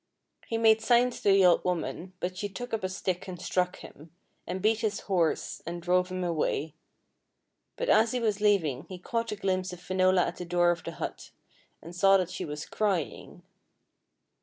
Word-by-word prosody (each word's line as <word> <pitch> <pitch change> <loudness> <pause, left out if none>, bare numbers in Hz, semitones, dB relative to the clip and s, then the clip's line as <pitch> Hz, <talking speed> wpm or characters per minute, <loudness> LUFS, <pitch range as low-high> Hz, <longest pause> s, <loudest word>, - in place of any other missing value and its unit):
He 230 - -1
made 220 -1 +5
signs 240 +2 +3
to - - +2
the 195 -1 +6
old 175 - +5
woman, 180 +1 -3
but 180 +1 -3
she 205 +2 -4
took 245 +5 -7
up 220 - -1
a 185 - -1
stick 185 -1 -3
and 180 -2 -7
struck 180 0 0
him, 155 +3 -13 0.4
and 180 +2 -3
beat 215 +3 +2
his 215 -2 -1
horse 175 -5 0
and 175 +1 -5
drove 180 +1 +1
him 185 0 -3
away; 160 -3 -1 1.0
but - - -3
as 225 - +4
he 250 - -1
was 215 -3 0
leaving 165 -11 +2
he 185 - -7
caught 230 +5 -3
a - - -2
glimpse 185 -2 -1
of 180 - -9
Finola 185 0 +2
at - - -5
the - - -5
door 175 0 +3
of 170 -1 -4
the - - -6
hut, - - -6 0.5
and 170 +2 -10
saw 195 +2 +5
that 185 -1 -2
she 185 - -4
was 150 -1 -6
crying. 195 -8 -2
185 Hz, 195 wpm, -28 LUFS, 175-210 Hz, 1.0 s, the